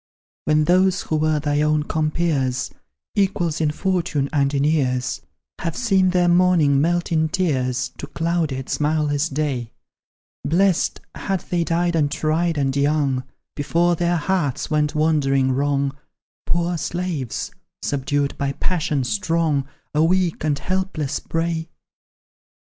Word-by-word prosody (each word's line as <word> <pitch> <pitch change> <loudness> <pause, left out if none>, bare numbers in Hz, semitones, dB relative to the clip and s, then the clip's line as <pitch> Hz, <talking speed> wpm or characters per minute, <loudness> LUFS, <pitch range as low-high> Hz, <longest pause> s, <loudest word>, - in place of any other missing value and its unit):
When 155 0 +3
those 185 +3 +3
who 155 - -2
were 155 0 +1
thy 145 0 0
own 150 0 +2
compeers, 155 -5 0 0.4
Equals 180 -5 0
in 155 - +2
fortune 155 -4 -1
and 140 -2 +2
in 140 -1 0
years, 130 -5 0 0.4
Have 165 -1 -3
seen 195 -6 +3
their 180 -1 +2
morning 175 -6 +4
melt 175 +2 0
in 160 -1 +2
tears, 130 -8 0
To 145 - -6
clouded, 160 -4 -1
smileless 150 0 0
day; 135 -5 -2 0.7
Blest, 180 +3 +2
had 195 -2 -2
they 175 -1 -1
died 170 +1 0
untried 155 +2 +1
and 135 -1 0
young, 140 -2 +1 0.3
Before 170 +4 +1
their 175 +1 +1
hearts 160 -5 -1
went 150 -1 +1
wandering 140 -4 +2
wrong, 140 0 0 0.5
Poor 175 0 0
slaves, 170 -8 -3 0.3
subdued 140 0 -1
by 140 -1 0
passions 150 -6 -1
strong, 165 -8 0 0.3
A 150 +1 +3
weak 180 -1 +1
and 150 -2 +1
helpless 185 -5 -2
prey! 165 0 -2
155 Hz, 125 wpm, -22 LUFS, 140-175 Hz, 0.7 s, morning